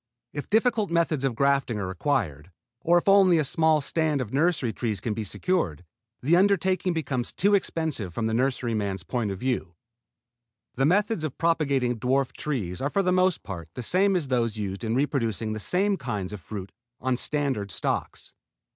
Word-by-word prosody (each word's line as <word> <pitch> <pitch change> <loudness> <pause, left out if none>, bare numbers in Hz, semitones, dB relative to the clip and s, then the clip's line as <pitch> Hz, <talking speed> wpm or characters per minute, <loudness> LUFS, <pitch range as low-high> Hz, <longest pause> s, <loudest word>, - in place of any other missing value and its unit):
If 145 - -5
difficult 220 -1 +2
methods 165 -4 +1
of 135 -4 0
grafting 140 -3 +1
are 100 - -2
required, 95 - -2 0.3
or 170 +6 +3
if 175 - -1
only 195 -3 +6
a 155 - +2
small 160 +2 +3
stand 155 0 0
of 125 -3 -4
nursery 145 -5 +1
trees 110 -5 -2
can 110 - -2
be 110 - -3
secured, 95 - -1 0.4
the 155 +6 +4
undertaking 185 -1 +2
becomes 135 -6 -2
too 200 +2 +2
expensive 160 - 0
from 110 +6 -3
the 110 - 0
nurseryman's 115 -7 -1
point 120 +2 -2
of 95 - -4
view. 110 -7 -2 1.0
The 135 +2 +2
methods 205 0 +1
of 155 -4 -4
propagating 140 -8 +1
dwarf 130 +3 +1
trees 110 -12 -3
are 140 - 0
for 195 +5 +1
the 180 - +2
most 185 -1 +2
part 85 -5 -7
the 125 - -4
same 190 - +3
as 155 -7 -1
those 115 -4 0
used 100 0 -4
in 115 +1 -1
reproducing 115 -6 0
the 110 - -4
same 195 - +1
kinds 105 - -4
of 105 - -7
fruit 100 -1 -7 0.3
on 130 0 0
standard 135 -7 -1
stocks. - - -3
135 Hz, 180 wpm, -26 LUFS, 110-170 Hz, 1.0 s, only